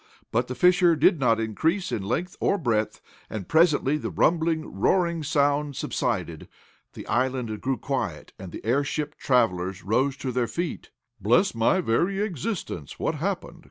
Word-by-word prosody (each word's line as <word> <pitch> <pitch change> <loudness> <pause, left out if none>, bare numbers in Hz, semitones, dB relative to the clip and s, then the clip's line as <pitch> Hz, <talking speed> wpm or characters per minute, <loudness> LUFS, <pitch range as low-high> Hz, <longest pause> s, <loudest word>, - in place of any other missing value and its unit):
But 120 +2 +1
the 125 - -5
fissure 180 0 +5
did 165 +2 +4
not 115 -4 +3
increase 160 - 0
in 105 - -1
length 160 - -2
or 200 - +2
breadth, 115 - -1 0.3
and, 105 -4 -5
presently 155 -3 +3
the - - -4
rumbling, 160 -1 +1
roaring 170 - +1
sound 145 -1 +1
subsided. 105 - -2 0.5
The - - -9
island 125 -3 -1
grew 130 -1 -1
quiet - - -4
and 95 -2 -8
the - - -9
airship 145 +4 0
travelers 95 -7 +1
rose 130 +6 +1
to 130 -3 -3
their 125 -1 0
feet. 170 +5 -4 0.3
"Bless 120 - +3
my 115 +11 +2
very 175 +9 +1
existence! 180 - -4
What - - -1
happened?" 170 +1 -3
140 Hz, 155 wpm, -25 LUFS, 115-170 Hz, 0.5 s, fissure